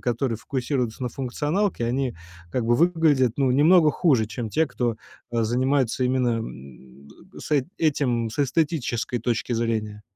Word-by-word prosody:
которые 120 Hz, -1 st, -1 dB
фокусируются 125 Hz, -1 st, -3 dB
на 125 Hz, -, -2 dB
функционалке, 145 Hz, -, -1 dB
они, 125 Hz, +1 st, -1 dB, 0.4 s
как 125 Hz, +3 st, -1 dB
бы, 120 Hz, +1 st, +3 dB
выглядят, 155 Hz, -6 st, +3 dB
ну, 135 Hz, -2 st, +2 dB
немного 155 Hz, +4 st, +5 dB
хуже, 135 Hz, -, +2 dB
чем 115 Hz, +1 st, -5 dB
те, 160 Hz, +8 st, +1 dB
кто, 120 Hz, -4 st, -2 dB, 0.3 s
а, 115 Hz, -1 st, 0 dB
занимается 130 Hz, +2 st, +1 dB
именно, 125 Hz, -2 st, +1 dB
м, 65 Hz, -, -10 dB, 0.3 s
с -, -, -9 dB
эт 145 Hz, -4 st, +2 dB
этим 125 Hz, -7 st, 0 dB
с 125 Hz, -, -10 dB
эстетической 135 Hz, -4 st, 0 dB
точки 120 Hz, +1 st, -2 dB
зрения. 110 Hz, -2 st, -2 dB
125 Hz, 150 wpm, -24 LUFS, 115-145 Hz, 0.4 s, немного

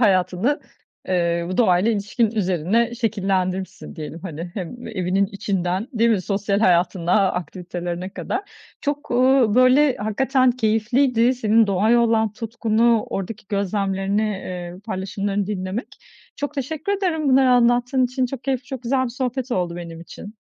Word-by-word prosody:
hayatını, 195 Hz, +5 st, +2 dB, 0.5 s
ııı, 170 Hz, -1 st, 0 dB
bu 185 Hz, -, -3 dB
doğayla 190 Hz, -2 st, +3 dB
ilişkin 215 Hz, +1 st, 0 dB
üzerine 210 Hz, +3 st, 0 dB
şekillendirmişsin 190 Hz, -6 st, -2 dB
diyelim, 155 Hz, +1 st, -7 dB
hani, 170 Hz, -1 st, -6 dB
hem 215 Hz, +6 st, -6 dB
evinin 195 Hz, -2 st, 0 dB
içinden, 195 Hz, +1 st, -2 dB
değil 230 Hz, -1 st, +3 dB
mi? 205 Hz, -4 st, +2 dB
Sosyal 200 Hz, +1 st, -1 dB
hayatına, 180 Hz, +1 st, +3 dB
aktivitelerine 180 Hz, 0 st, -5 dB
kadar. 370 Hz, -, -3 dB, 0.4 s
Çok, 290 Hz, +1 st, -3 dB
ııı, 255 Hz, -3 st, +4 dB
böyle, 255 Hz, +2 st, +5 dB
hakikaten 255 Hz, +5 st, +2 dB
keyifliydi 240 Hz, +2 st, +2 dB
senin 225 Hz, -2 st, +3 dB
doğaya 210 Hz, +5 st, +3 dB
olan 225 Hz, -2 st, +2 dB
tutkunu, 230 Hz, 0 st, +1 dB
oradaki 200 Hz, +2 st, -5 dB
gözlemlerini, 200 Hz, +1 st, -1 dB, 0.3 s
ııı, 185 Hz, -, -12 dB
paylaşımlarını 200 Hz, -1 st, -3 dB
dinlemek. 195 Hz, +2 st, -4 dB, 0.4 s
Çok 290 Hz, 0 st, -4 dB
teşekkür 305 Hz, +7 st, -3 dB
ederim 345 Hz, -7 st, 0 dB
bunları 260 Hz, -1 st, +5 dB
anlattığın 245 Hz, +1 st, +3 dB
için. 255 Hz, +1 st, 0 dB
Çok 255 Hz, 0 st, -7 dB
keyifli, 265 Hz, -2 st, -1 dB
çok 260 Hz, -2 st, -7 dB
güzel 260 Hz, +2 st, +1 dB
bir 255 Hz, -, -2 dB
sohbet 255 Hz, 0 st, -3 dB
oldu 175 Hz, -4 st, -1 dB
benim 165 Hz, -1 st, -8 dB
için. 205 Hz, +5 st, -10 dB
215 Hz, 140 wpm, -22 LUFS, 185-245 Hz, 0.5 s, böyle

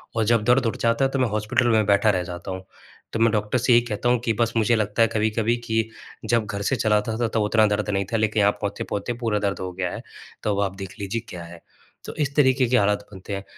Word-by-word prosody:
और 115 Hz, -, +2 dB
जब 115 Hz, -1 st, +2 dB
दर्द 125 Hz, +2 st, +3 dB
उठ 115 Hz, -, -1 dB
जाता 115 Hz, +3 st, +2 dB
है, 135 Hz, -, -1 dB
तो 135 Hz, -, -1 dB
मैं 130 Hz, -, +2 dB
हॉस्पिटल 110 Hz, +4 st, 0 dB
में 110 Hz, -2 st, +3 dB
बैठा 100 Hz, +2 st, +3 dB
रह 90 Hz, -3 st, +1 dB
जाता 90 Hz, +1 st, -7 dB
हूँ। 95 Hz, 0 st, -6 dB, 0.5 s
तो 115 Hz, -, -2 dB
मैं 115 Hz, -1 st, +4 dB
डॉक्टर 105 Hz, +2 st, 0 dB
से 125 Hz, -, +1 dB
यही 120 Hz, -, +6 dB
कहता 120 Hz, +2 st, -1 dB
हूँ 125 Hz, -, +3 dB
कि 115 Hz, -, +2 dB
बस 115 Hz, +1 st, 0 dB
मुझे 115 Hz, +1 st, +3 dB
लगता 105 Hz, 0 st, 0 dB
है 115 Hz, -, +6 dB
कभी-कभी 110 Hz, +2 st, 0 dB
कि 115 Hz, -1 st, 0 dB, 0.4 s
जब 115 Hz, -2 st, +2 dB
घर 100 Hz, 0 st, -5 dB
से 115 Hz, -, 0 dB
चल 110 Hz, -3 st, +1 dB
आता 110 Hz, +1 st, 0 dB
था, 120 Hz, -, 0 dB
तब 110 Hz, 0 st, -1 dB
उतना 110 Hz, +1 st, +3 dB
दर्द 105 Hz, 0 st, -1 dB
नहीं 100 Hz, -1 st, 0 dB
था, 115 Hz, -, +3 dB
लेकिन 110 Hz, 0 st, +1 dB
यहाँ 100 Hz, -, +4 dB
पहुँचते-पहुँचते 100 Hz, +2 st, -3 dB
पूरा 105 Hz, -2 st, +1 dB
दर्द 100 Hz, -1 st, -2 dB
हो 95 Hz, -1 st, -4 dB
गया 90 Hz, -1 st, -3 dB
है, -, -, -6 dB, 0.4 s
तो 105 Hz, -2 st, 0 dB
अब 100 Hz, -, 0 dB
आप 95 Hz, 0 st, -5 dB
देख 95 Hz, -2 st, -8 dB
लीजिए 100 Hz, +3 st, -3 dB
क्या 85 Hz, -1 st, -7 dB
है। 85 Hz, 0 st, -12 dB, 0.4 s
तो -, -, -7 dB
इस 140 Hz, -2 st, -1 dB
तरीके 130 Hz, -3 st, +4 dB
के 125 Hz, -, +4 dB
हालात 105 Hz, -1 st, +1 dB
बनते 95 Hz, +1 st, -6 dB
हैं। 95 Hz, -, -6 dB
110 Hz, 270 wpm, -23 LUFS, 100-115 Hz, 0.5 s, यही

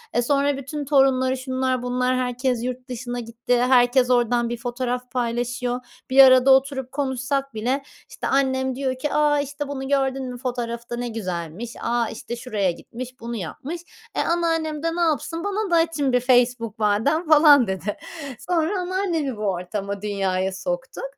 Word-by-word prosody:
Eee, 240 Hz, -, +4 dB
sonra 280 Hz, +2 st, +1 dB
bütün 285 Hz, +2 st, -5 dB
torunları, 265 Hz, -2 st, +3 dB
şunlar, 260 Hz, -1 st, -1 dB
bunlar, 250 Hz, +1 st, 0 dB
herkes 250 Hz, -1 st, -1 dB
yurt 250 Hz, 0 st, -5 dB
dışına 245 Hz, 0 st, -4 dB
gitti. 240 Hz, +1 st, -1 dB
Herkes 250 Hz, 0 st, +4 dB
oradan 240 Hz, -1 st, +2 dB
bir 240 Hz, -, -3 dB
fotoğraf 250 Hz, +1 st, -3 dB
paylaşıyor. 245 Hz, 0 st, -1 dB, 0.3 s
Bir 270 Hz, +1 st, +8 dB
arada 260 Hz, 0 st, +7 dB
oturup 265 Hz, -1 st, +2 dB
konuşsak 275 Hz, -1 st, -2 dB
bile 255 Hz, +6 st, -1 dB, 0.3 s
işte -, -, -5 dB
annem 260 Hz, -1 st, +1 dB
diyor 260 Hz, -1 st, -1 dB
ki: 295 Hz, +2 st, -2 dB
"A, 295 Hz, -1 st, +3 dB
işte 285 Hz, +1 st, -5 dB
bunu 270 Hz, -1 st, -5 dB
gördün 270 Hz, -2 st, 0 dB
mü 245 Hz, -, -7 dB
fotoğrafta 240 Hz, -1 st, -4 dB
ne 245 Hz, 0 st, -3 dB
güzelmiş. 185 Hz, -1 st, -5 dB
A, 235 Hz, 0 st, 0 dB
işte 235 Hz, +2 st, -6 dB
şuraya 210 Hz, -6 st, -1 dB
gitmiş. 255 Hz, +7 st, -9 dB
Bunu 235 Hz, +1 st, -5 dB
yapmış." 265 Hz, -, -6 dB, 0.3 s
Eee, -, -, +1 dB
anneannem 325 Hz, -2 st, 0 dB
de 330 Hz, 0 st, 0 dB
ne 350 Hz, -, -1 dB
yapsın? 325 Hz, 0 st, 0 dB
"Bana 405 Hz, -1 st, -2 dB
da -, -, +4 dB
açın 320 Hz, -5 st, +2 dB
bir 250 Hz, -, +5 dB
Facebook 245 Hz, -3 st, +2 dB
madem." 225 Hz, +11 st, +1 dB
falan 295 Hz, -5 st, +7 dB
dedi. 190 Hz, +2 st, -3 dB, 0.4 s
Sonra 355 Hz, +2 st, 0 dB
anneannemi 355 Hz, -, -1 dB
bu -, -, -7 dB
ortama, 200 Hz, +1 st, -3 dB
dünyaya 190 Hz, -2 st, -1 dB
soktuk. -, -, -4 dB
255 Hz, 160 wpm, -23 LUFS, 240-285 Hz, 0.4 s, Bir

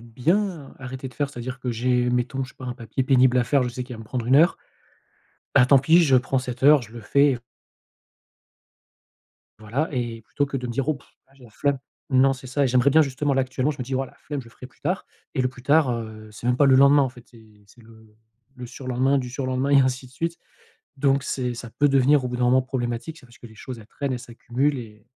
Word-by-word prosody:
bien 155 Hz, -, -1 dB
arrêter 130 Hz, 0 st, -7 dB
de 125 Hz, -, -17 dB
faire, 145 Hz, +2 st, -2 dB
c'est-à-dire 125 Hz, 0 st, -6 dB
que 125 Hz, -, -2 dB
j'ai 125 Hz, +1 st, +1 dB
mettons 125 Hz, +2 st, -1 dB
je 125 Hz, -, -12 dB
sais -, -, -23 dB
pas 130 Hz, -, -10 dB
un 125 Hz, -, -4 dB
papier 115 Hz, +3 st, -3 dB
pénible 130 Hz, -1 st, +4 dB
à 120 Hz, -, +2 dB
faire, 135 Hz, +3 st, +2 dB
je 125 Hz, -, -1 dB
sais 125 Hz, +1 st, -5 dB
qu'il 125 Hz, 0 st, -8 dB
va -, -, -10 dB
me -, -, -10 dB
prendre 120 Hz, +1 st, -4 dB
1 130 Hz, +2 st, +5 dB
heure. 165 Hz, +4 st, +5 dB, 1.0 s
Bah 125 Hz, -, +6 dB
tant 135 Hz, +1 st, +6 dB
pis, 160 Hz, +6 st, +5 dB
je 135 Hz, -5 st, +4 dB
prends 130 Hz, +1 st, +1 dB
cette 125 Hz, -1 st, -6 dB
heure, 145 Hz, 0 st, +6 dB
je 110 Hz, -1 st, -12 dB
le 120 Hz, -, -8 dB
fais 140 Hz, +3 st, +3 dB, 2.2 s
voilà 115 Hz, +9 st, -2 dB
et 120 Hz, -3 st, -3 dB
plutôt 145 Hz, +6 st, -2 dB
que 135 Hz, 0 st, -4 dB
de 125 Hz, -, -4 dB
me 120 Hz, -, -4 dB
dire: 135 Hz, +4 st, -2 dB
«Oh 155 Hz, -, +2 dB
pff, 140 Hz, -, -16 dB, 0.2 s
là, 135 Hz, -, -27 dB
j'ai 135 Hz, -2 st, -18 dB
la 120 Hz, -, -15 dB
flemme!» 140 Hz, +4 st, -1 dB, 0.3 s
Non, 135 Hz, +1 st, +4 dB
c'est 130 Hz, -1 st, -9 dB
ça 140 Hz, +3 st, 0 dB
et -, -, +3 dB
j'aimerais 125 Hz, +2 st, +3 dB
bien 160 Hz, +3 st, +6 dB
justement 140 Hz, +1 st, -1 dB
là 135 Hz, -, +3 dB
actuellement, 130 Hz, +2 st, -1 dB
je 145 Hz, -, -7 dB
me -, -, -3 dB
dis: 130 Hz, +2 st, -4 dB
«Voilà, 130 Hz, 0 st, -2 dB
la -, -, -25 dB
flemme, 145 Hz, -2 st, -5 dB
je 125 Hz, -, -14 dB
le -, -, -14 dB
ferai 125 Hz, -, -11 dB
plus 125 Hz, -, -27 dB
tard» 180 Hz, +6 st, -2 dB, 0.3 s
et -, -, 0 dB
le 125 Hz, -, +1 dB
plus 125 Hz, -1 st, -14 dB
tard, 145 Hz, 0 st, +3 dB
heu, 110 Hz, -2 st, -6 dB
c'est 105 Hz, -, -8 dB
même 125 Hz, 0 st, +2 dB
pas 145 Hz, -, +4 dB
le 135 Hz, -, +6 dB
lendemain 140 Hz, +1 st, +6 dB
en 135 Hz, -, +1 dB
fait, 125 Hz, -1 st, -15 dB
c'est 110 Hz, -3 st, -20 dB
c'est 115 Hz, +4 st, -20 dB
le 110 Hz, 0 st, -17 dB
le 105 Hz, -1 st, -23 dB, 0.4 s
le 125 Hz, -, -7 dB
surlendemain 130 Hz, +2 st, 0 dB
du 125 Hz, -2 st, -4 dB
surlendemain 130 Hz, +1 st, -2 dB
et 140 Hz, -, +6 dB
ainsi 130 Hz, 0 st, 0 dB
de 125 Hz, -, -18 dB
suite. 165 Hz, +5 st, -3 dB, 0.6 s
Donc 135 Hz, 0 st, +2 dB
c'est 125 Hz, -3 st, -2 dB
ça 120 Hz, -1 st, -8 dB
peut 145 Hz, +4 st, +2 dB
devenir 135 Hz, +1 st, +4 dB
au -, -, -1 dB
bout 125 Hz, -, -4 dB
d'un 125 Hz, -, 0 dB
moment 130 Hz, +2 st, +4 dB
problématique, 125 Hz, +4 st, -4 dB
c'est 125 Hz, -, -17 dB
parce 120 Hz, 0 st, -19 dB
que -, -, -12 dB
les 110 Hz, -, -15 dB
choses, 120 Hz, +3 st, -8 dB
elles 110 Hz, -, -14 dB
traînent, 140 Hz, +4 st, -4 dB
elles 125 Hz, -, -2 dB
s'accumulent 125 Hz, +4 st, -2 dB
et 105 Hz, -3 st, -11 dB
130 Hz, 265 wpm, -24 LUFS, 120-140 Hz, 2.2 s, Bah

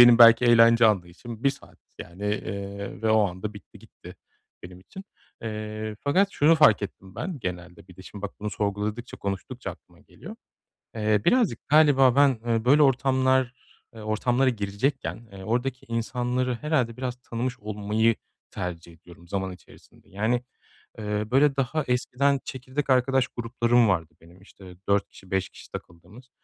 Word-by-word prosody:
benim 120 Hz, -1 st, +9 dB
belki 115 Hz, +1 st, +8 dB
eğlence 115 Hz, -1 st, +6 dB
anlayışım 105 Hz, +4 st, -2 dB
1 140 Hz, -, +5 dB
saat 135 Hz, -, -14 dB, 0.2 s
yani, 90 Hz, +4 st, -9 dB
eee, 100 Hz, -1 st, -4 dB
ve 110 Hz, -, +2 dB
o 110 Hz, -, +5 dB
anda 95 Hz, +4 st, -6 dB
bitti, 100 Hz, -, -14 dB
gitti -, -, -14 dB, 0.5 s
benim 90 Hz, 0 st, -11 dB
için. 190 Hz, -, -12 dB, 0.4 s
Eee, 110 Hz, -1 st, -5 dB
fakat 185 Hz, +8 st, +2 dB
şunu 155 Hz, +3 st, +4 dB
fark 130 Hz, -11 st, +5 dB
ettim 95 Hz, -1 st, -8 dB
ben 170 Hz, -2 st, -5 dB
genelde 90 Hz, -2 st, -7 dB
bir 90 Hz, -, -15 dB
de, 95 Hz, -, -12 dB
şimdi, 100 Hz, +1 st, -11 dB
bak 100 Hz, -, -4 dB
bunu 105 Hz, -, -3 dB
sorguladıkça, 105 Hz, +3 st, -3 dB
konuştukça 95 Hz, -1 st, -5 dB
aklıma -, -, -17 dB
geliyor. -, -, -12 dB, 0.6 s
Eee, 105 Hz, -2 st, +1 dB
birazcık 230 Hz, -, +1 dB
galiba 140 Hz, -4 st, +5 dB
ben, 140 Hz, -4 st, +4 dB
eee, 115 Hz, -1 st, 0 dB
böyle 145 Hz, +5 st, +5 dB
ortamlar, 130 Hz, -1 st, +2 dB, 0.4 s
eee, 110 Hz, -, -10 dB
ortamlara 120 Hz, +5 st, +1 dB
girecekken, 115 Hz, +3 st, -3 dB
eee, 95 Hz, -1 st, -10 dB
oradaki 125 Hz, +3 st, -2 dB
insanları 125 Hz, +2 st, -1 dB
herhâlde 125 Hz, -4 st, -1 dB
biraz 125 Hz, -1 st, -4 dB
tanımış 125 Hz, +1 st, -4 dB
olmayı 105 Hz, +1 st, 0 dB, 0.3 s
tercih 85 Hz, -1 st, -6 dB
ediyorum 85 Hz, +1 st, -17 dB
zaman 95 Hz, -1 st, -3 dB
içerisinde. 90 Hz, -, -18 dB
Yani, 110 Hz, +5 st, 0 dB, 0.6 s
eee, 105 Hz, -1 st, -2 dB
böyle 140 Hz, +1 st, +4 dB
daha 140 Hz, +3 st, -1 dB
eskiden 135 Hz, +3 st, +1 dB
çekirdek 130 Hz, +2 st, -5 dB
arkadaş 130 Hz, 0 st, +3 dB
gruplarım 120 Hz, 0 st, +1 dB
vardı 85 Hz, -4 st, -1 dB
benim, 85 Hz, +3 st, -18 dB
işte, 95 Hz, -2 st, -14 dB
4 100 Hz, 0 st, +2 dB
kişi, 95 Hz, -, -17 dB
5 95 Hz, -1 st, 0 dB
kişi -, -, -15 dB
takıldığımız. 90 Hz, +10 st, -11 dB
115 Hz, 155 wpm, -25 LUFS, 100-130 Hz, 0.6 s, benim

